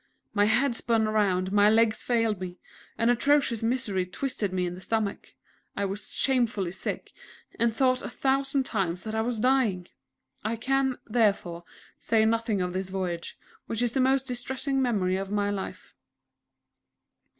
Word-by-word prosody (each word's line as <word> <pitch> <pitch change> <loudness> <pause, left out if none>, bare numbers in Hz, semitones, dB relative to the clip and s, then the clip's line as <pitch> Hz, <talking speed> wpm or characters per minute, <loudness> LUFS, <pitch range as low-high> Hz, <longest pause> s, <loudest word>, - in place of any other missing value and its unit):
My 205 -1 +4
head 240 +4 +2
spun 225 -2 +1
round; 190 -4 +1
my 205 0 +5
legs 220 0 +3
failed 225 -5 0
me; 180 -1 -6 0.4
an 230 +1 +3
atrocious 270 -1 +2
misery 225 -5 0
twisted 205 +1 -3
me 185 -1 0
in 175 - -3
the 180 - -9
stomach. 215 -1 -2 0.4
I 200 - 0
was 200 +2 -3
shamefully 235 -9 +1
sick, 190 - -5 0.5
and 235 0 +3
thought 255 +2 +2
a - - -5
thousand 270 +2 +1
times 185 -7 -2
that 220 - -5
I 220 - +1
was 235 0 -1
dying! 225 -8 +2 0.5
I 220 +2 -1
can, 265 +2 0
therefore, 200 -7 0 0.3
say 220 0 +3
nothing 225 -3 +1
of 180 0 -3
this 190 0 -3
voyage, 180 -3 -4 0.3
which 225 +1 -1
is 240 - +1
the 265 - -1
most 265 +1 +3
distressing 265 +2 -2
memory 195 -7 +1
of 195 0 -4
my 205 0 0
life. 195 -1 -6
220 Hz, 160 wpm, -27 LUFS, 195-245 Hz, 0.5 s, my